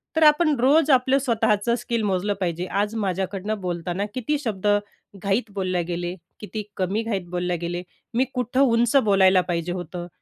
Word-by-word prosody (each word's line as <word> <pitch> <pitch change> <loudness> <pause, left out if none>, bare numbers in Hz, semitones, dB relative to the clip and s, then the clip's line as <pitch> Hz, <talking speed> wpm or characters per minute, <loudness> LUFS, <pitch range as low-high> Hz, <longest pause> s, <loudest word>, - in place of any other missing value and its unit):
तर 320 - +3
आपण 305 0 +5
रोज 290 +4 +4
आपलं 260 +1 +4
स्वतःचं 235 -3 +1
स्किल 235 -1 -2
मोजलं 200 0 0
पाहिजे. 175 -1 -2
आज 205 +3 -1
माझ्याकडनं 195 +1 -2
बोलताना 180 +2 -2
किती 260 +5 -1
शब्द 210 -7 -3 0.6
घाईत 205 +3 0
बोलले 185 -2 -1
गेले, 175 +1 -3 0.2
किती 215 0 -5
कमी 190 +4 0
घाईत 200 -6 -3
बोलले 180 0 -1
गेले. 175 +1 -3 0.3
मी 250 +3 +2
कुठं 250 +1 0
उंच 235 -1 +3
बोलायला 190 -2 +5
पाहिजे 170 0 -1
होतं, 175 0 -5
205 Hz, 160 wpm, -24 LUFS, 180-240 Hz, 0.6 s, आपण